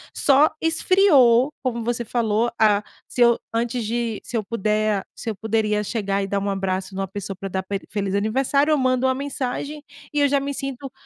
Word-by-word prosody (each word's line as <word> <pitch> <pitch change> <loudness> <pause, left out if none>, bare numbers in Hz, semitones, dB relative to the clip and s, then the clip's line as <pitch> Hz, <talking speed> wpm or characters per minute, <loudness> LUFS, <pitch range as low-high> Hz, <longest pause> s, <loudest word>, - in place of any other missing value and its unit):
Só 285 +2 +4
esfriou, 305 -7 +4
como 235 -3 -2
você 235 0 -2
falou. 230 0 0
Ah, 210 -1 +4 0.2
se 245 - -3
eu 235 -1 +5
antes 235 +1 -1
de 230 -1 -2
se 235 - -4
eu 215 - -1
puder 215 -1 0
se 230 - -5
eu - - -7
poderia 215 -1 0
chegar 200 -2 -1
e - - -3
dar 200 0 -1
um 200 - -1
abraço 190 -1 -2
numa 195 0 -2
pessoa 195 0 -6
para 195 -1 -6
dar 190 +1 -2
pe 195 +1 -3
feliz 200 -2 -2
aniversário, 270 +8 +1
eu 305 - +4
mando 255 0 +2
uma 260 - +1
mensagem 280 +2 -4 0.3
e 295 - +1
eu 285 - +5
já 280 0 +3
me 280 +1 -3
sinto 275 -1 -5
230 Hz, 200 wpm, -22 LUFS, 205-265 Hz, 0.3 s, eu